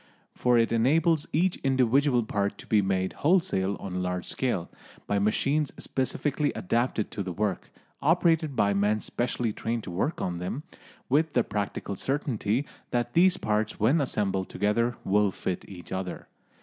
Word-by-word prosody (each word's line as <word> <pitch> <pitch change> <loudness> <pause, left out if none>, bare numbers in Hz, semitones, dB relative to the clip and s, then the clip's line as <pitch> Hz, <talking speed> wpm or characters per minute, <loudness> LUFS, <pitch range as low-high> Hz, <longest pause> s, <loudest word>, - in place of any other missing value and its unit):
For 125 -1 +2
it 115 -1 +3
enables 150 +7 +3
each 175 +3 +2
individual 130 0 +2
part 100 -1 -1
to - - -11
be 105 -2 +3
made 95 -1 0
wholesale 150 - +1
on 95 - -6
a 90 - -1
large 90 -1 -2
scale, 120 -10 -1 0.4
by 100 - 0
machines 135 +8 +1
specially 145 +2 -1
adapted 115 +2 0
to 105 - -4
the 95 -2 -3
work, 100 0 -2 0.3
operated 165 -1 +2
by 100 -2 +3
men 105 +2 +2
specially 120 -1 -2
trained 115 +1 -3
to 90 - -7
work 100 - -1
them, 90 +10 -3 0.4
with 150 +3 +2
the 120 - +3
practical 100 -1 -3
certainty 130 -1 -1 0.2
that 120 0 -1
these 180 +2 +5
parts 105 0 -1
when 130 +9 +3
assembled 100 -7 -1
together 115 +4 0
will 105 +1 +3
fit 95 -1 -4
each 90 -4 -10
other. 95 -1 -4
115 Hz, 155 wpm, -27 LUFS, 100-140 Hz, 0.4 s, these